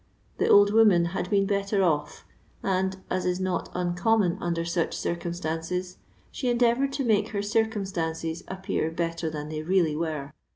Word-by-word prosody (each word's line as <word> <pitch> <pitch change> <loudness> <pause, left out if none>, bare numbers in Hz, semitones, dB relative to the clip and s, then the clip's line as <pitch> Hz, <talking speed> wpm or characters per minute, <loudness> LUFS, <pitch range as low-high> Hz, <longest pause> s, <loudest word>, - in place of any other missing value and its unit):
The - - +2
old 205 0 +6
woman 210 -6 +5
had 180 -1 -2
been 200 -1 +3
better 200 0 +1
off, 155 -5 -1 0.4
and, 190 0 0
as 185 - 0
is 180 0 0
not 185 -1 -2
uncom 180 +5 +2
mon 175 -3 0
under 170 -1 -1
such 170 0 -1
circumstances, 175 +1 -3 0.3
she 255 - -2
endeavoured 240 +3 +2
to 275 0 -1
make 215 -2 +2
her 205 -2 -3
circumstances 190 -7 -1
appear 190 -4 -2
better 165 0 -2
than 150 -1 -6
they 155 0 -4
really 165 -2 +2
were. 155 -3 -3
180 Hz, 160 wpm, -26 LUFS, 165-205 Hz, 0.4 s, old